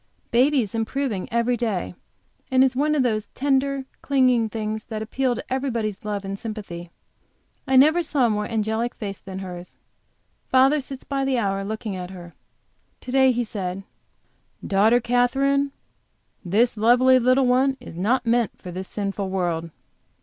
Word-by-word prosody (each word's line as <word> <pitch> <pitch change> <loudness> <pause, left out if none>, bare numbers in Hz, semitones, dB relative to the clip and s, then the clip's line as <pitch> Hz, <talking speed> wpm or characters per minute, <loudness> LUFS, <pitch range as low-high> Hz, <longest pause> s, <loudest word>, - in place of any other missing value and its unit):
Baby 260 +2 +4
is 205 - -8
improving 225 -2 -2
every 235 +1 +1
day, 215 -8 -2 0.6
and 260 -1 +5
is 265 -1 +2
one 300 +3 +1
of 280 - +2
those 215 -3 -1
tender, 275 0 0 0.2
clinging 255 -4 +3
little - - -4
things 215 0 -3
that 220 -1 -4
appeal 250 +3 -1
to - - -5
everybody's 235 -6 -2
love 205 -2 -3
and 195 0 -5
sympathy. 200 -6 -7 0.8
I 265 - +2
never 310 +6 +6
saw 295 -5 +1
a - - +3
more 210 0 -1
angelic 225 +1 -1
face 200 -3 -6
than 190 -1 -8
hers. 180 -2 -8 0.7
Father 270 +3 +4
sits 270 -1 -7
by 275 -1 -2
the 270 -1 +1
hour 195 -3 -1
looking 215 0 -4
at 180 -1 -6
her. 175 -3 -10 0.7
To 250 - -7
day 265 0 +5
he 245 0 0
said: 195 -4 -5 0.8
"Daughter 215 +5 +4
Katherine, 275 +4 +2 0.7
this 215 +6 +2
lovely 250 +4 +5
little 255 +2 +3
one 260 +2 +2
is 245 - -11
not 235 +9 +1
meant 235 0 +1
for 180 - -8
this 185 +2 -6
sinful 200 -1 -3
world." 175 -3 -2
235 Hz, 165 wpm, -23 LUFS, 200-260 Hz, 0.8 s, never